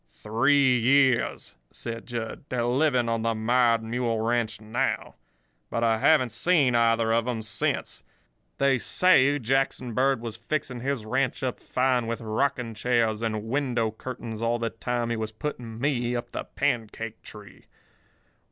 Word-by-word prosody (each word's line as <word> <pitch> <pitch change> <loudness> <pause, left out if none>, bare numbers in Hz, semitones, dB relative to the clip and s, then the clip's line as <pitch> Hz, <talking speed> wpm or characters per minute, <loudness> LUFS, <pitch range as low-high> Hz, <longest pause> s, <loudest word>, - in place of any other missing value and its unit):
"Three 130 +3 +3
years," 130 +1 +2 0.2
said 115 -1 -7
Jud. 120 +2 -5
"They're 120 -2 -1
living 125 -1 +2
on 115 -1 0
the 115 0 0
Mired 115 +1 +2
Mule 115 0 -1
Ranch 115 -2 0
now. 115 +5 -2 0.6
But 115 - -1
I 115 -1 +2
haven't 130 -3 +4
seen 135 +2 +2
either 115 -1 +3
of 115 +1 +1
'em 115 -3 -2
since. 110 - -2 0.6
They 135 -2 +3
say 145 -2 +4
Jackson 130 -1 -1
Bird 135 +1 +2
was 115 -2 -6
fixing 125 +1 -3
his 130 -3 -2
ranch 130 +4 -1
up 130 -2 -2
fine 125 -2 0
with 115 0 -3
rocking 120 +1 -1
chairs 115 -1 +1
and 110 -2 -2
window 120 -2 0
curtains 115 -1 -7
all 115 +1 +1
the 115 -1 -2
time 120 0 -2
he - - 0
was 110 -1 -4
putting 115 -2 -6
me 125 -3 0
up 120 0 -4
the - - -5
pancake 115 -1 -3
tree. 105 -1 -13
120 Hz, 150 wpm, -26 LUFS, 115-130 Hz, 0.6 s, haven't